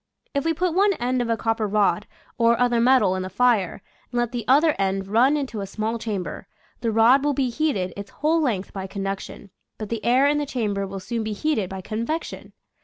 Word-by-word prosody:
If 280 0 -1
we 325 0 +1
put 355 +1 0
one 400 +3 +3
end 250 -3 -1
of 235 - -2
a 230 - +1
copper 225 -1 0
rod 205 0 +1 0.3
or 230 0 +4
other 240 -1 +2
metal 235 -7 +4
in 185 - -2
the 185 - -4
fire 210 -2 +1 0.3
and 245 - -3
let 240 -1 0
the 240 -2 -3
other 300 +4 +5
end 195 0 0
run 240 +9 +3
into 255 -7 -4
a 195 - -5
small 220 +3 -3
chamber, 205 -5 -4 0.3
the 230 - -1
rod 235 +5 +5
will 290 -1 +1
be 260 -2 0
heated 230 - -1
its 200 0 -7
whole 320 +2 +1
length 215 -10 -1
by 195 -1 -5
conduction, 195 0 -6 0.3
but 215 -2 -6
the 230 -2 -3
air 255 +3 +4
in 295 +1 +3
the 290 - -2
cham 225 -6 -1
ber 200 0 -2
will 195 0 -6
soon 230 +4 -3
be 215 0 -3
heated 215 -5 -1
by 190 0 -6
convection. 230 - -4
230 Hz, 225 wpm, -23 LUFS, 200-265 Hz, 0.3 s, other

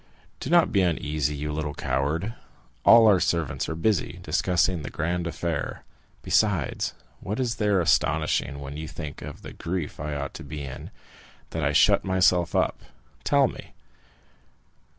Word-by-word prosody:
"Do - - -5
not 170 0 +5
be 100 - +3
uneasy, 75 -4 0
you 75 +1 -3
little 75 -1 -3
coward! 70 - -1 0.5
All 115 -1 +8
our 100 -4 +6
servants 85 -6 -1
are 80 - -3
busy, 90 +1 0
discussing 90 -1 +1
the - - -5
grand 85 +2 -2
affair. 85 0 -3 0.4
Besides, 95 -11 +1 0.2
what 105 +5 -4
is 120 -2 -1
there 105 -4 +2
astonishing, 75 -3 +1
when 70 +1 -7
you 80 0 -5
think 75 -2 -7
of - - -9
the - - -8
grief 85 -3 -4
I 75 +1 -3
ought 70 -1 -4
to - - -8
be 75 0 -6
in, 65 -2 -7 0.6
that 80 - -3
I 70 - +2
shut - - +4
myself 90 -2 +2
up?—tell - - 0
me!" - - -10
80 Hz, 150 wpm, -26 LUFS, 75-95 Hz, 0.6 s, All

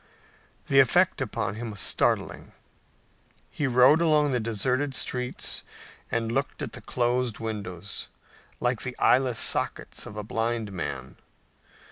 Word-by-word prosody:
The 135 - +4
effect 175 +5 +4
upon 100 -5 -2
him 115 +2 -5
was 100 -2 -6
startling. - - 0 1.0
He 145 - -1
rode 130 +5 +6
along 150 -3 +3
the 125 - +1
deserted 125 +5 -1
streets 125 -1 -2 0.5
and 115 -1 -1
looked 135 +4 -2
at - - -5
the - - -4
closed 120 -2 0
windows, 100 -4 -6 0.5
like 120 -2 0
the 125 0 -5
eyeless 125 -2 +3
sockets - - +1
of 105 - -9
a 105 - -3
blind 115 0 -2
man. 70 -8 -5
120 Hz, 130 wpm, -27 LUFS, 110-130 Hz, 1.0 s, rode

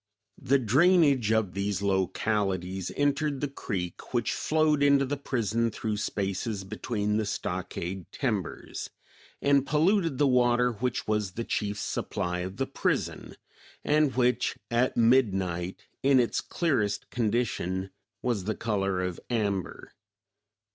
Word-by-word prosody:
The 140 +2 +3
drainage 140 - +4
of 110 -5 +1
these 100 +1 -2
localities 95 -1 0
entered 145 0 +1
the 145 - -1
creek 100 -6 -5
which 120 -2 +1
flowed 155 -2 +2
into 140 -1 +5
the 140 +2 -2
prison 115 -4 0
through 105 -1 -3
spaces 100 +1 -2
between 105 +1 -2
the 110 - 0
stockade 90 -1 -4
timbers, 110 - -3 0.5
and 140 -1 +4
polluted 165 +1 +2
the 145 - +3
water 125 -1 +3
which 120 +2 -2
was 105 -3 0
the 115 - -3
chief 105 -2 -2
supply 90 -3 -2
of 95 +2 -5
the 135 - 0
prison, 135 - -2 0.5
and 150 -2 +2
which, 125 -1 +1
at 120 +2 +1
midnight, 95 -8 +2 0.2
in 135 -1 +5
its 120 - +1
clearest 120 - -1
condition, 105 -5 -1 0.3
was 115 -7 -1
the 110 0 -1
color 100 -5 -1
of 90 -2 -3
amber. 100 -6 -2
115 Hz, 125 wpm, -28 LUFS, 95-135 Hz, 0.5 s, into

